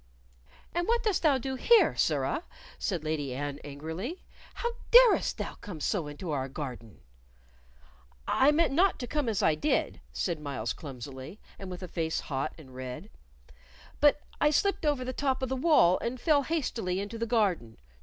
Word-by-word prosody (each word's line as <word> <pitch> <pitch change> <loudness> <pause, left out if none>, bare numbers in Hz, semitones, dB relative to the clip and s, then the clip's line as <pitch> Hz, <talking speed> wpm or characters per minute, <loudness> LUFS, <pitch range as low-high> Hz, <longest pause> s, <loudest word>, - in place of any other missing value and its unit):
"And 345 0 -1
what 470 +1 +2
dost 425 -5 +1
thou 295 -5 +4
do 265 +1 -4
here, 455 - +5
sirrah?" - - 0 0.4
said 180 -7 -2
Lady 150 -4 -2
Anne, 145 +1 -4
angrily. 160 - -6 0.3
"How 475 - -2 0.2
darest - - +6
thou - - -4
come 180 -6 -7
so 165 0 -1
into 150 +3 -6
our 135 -2 -2
garden?" 125 -6 -7 1.3
"I 275 +3 +4
meant 325 -1 +2
not 370 +6 +3
to 245 - -4
come 290 -1 -1
as 210 -1 0
I 160 - +5
did," 295 - 0
said 170 -4 -2
Myles, 140 -6 -3
clumsily, 135 - -9 0.2
and 195 - -7
with 180 0 -7
a - - -5
face 160 -2 -2
hot 135 -2 -3
and 135 -5 -14
red. 130 +10 -7 0.9
"But 290 0 +5 0.2
I 295 - +5
slipped 325 +2 +1
over 280 -4 +1
the 255 - -3
top 265 -1 -1
of 260 - -1
the 265 - -1
wall 260 - +4
and 245 +2 -3
fell 300 -1 +3
hastily 245 - -2
into 205 +3 -5
the 230 - -1
garden. 190 - 0
200 Hz, 175 wpm, -29 LUFS, -, 1.3 s, darest